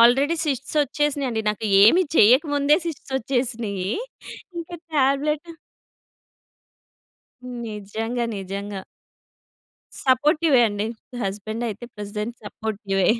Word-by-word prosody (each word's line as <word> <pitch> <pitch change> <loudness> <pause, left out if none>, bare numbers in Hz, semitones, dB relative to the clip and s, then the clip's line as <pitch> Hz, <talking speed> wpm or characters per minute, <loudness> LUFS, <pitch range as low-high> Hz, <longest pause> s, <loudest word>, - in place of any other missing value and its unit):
Already 270 +8 +5
cysts 275 +1 -2
ఒచ్చేసినియండి 280 -4 -1
నాకు. 210 +1 -2 0.2
ఏమి 345 - +6
చెయ్యకముందే 285 +5 +5
cysts 280 -4 -6
ఒచ్చేసినియ్యీ. 225 -6 -2 0.7
ఇంక 335 +1 -6 0.2
టాబ్లెటు 295 +4 +1 2.2
నిజంగా. 220 +3 -3
నిజంగా. 195 0 -5 1.2
సపోర్టివే 290 +1 +4
అండి. 205 +1 -2 0.3
నా 245 - -5
హస్బెండయితే 215 +3 -4
ప్రెజెంట్ 210 +3 -4
సపోర్టివే. 205 -3 -1
240 Hz, 80 wpm, -23 LUFS, 210-280 Hz, 2.2 s, ఏమి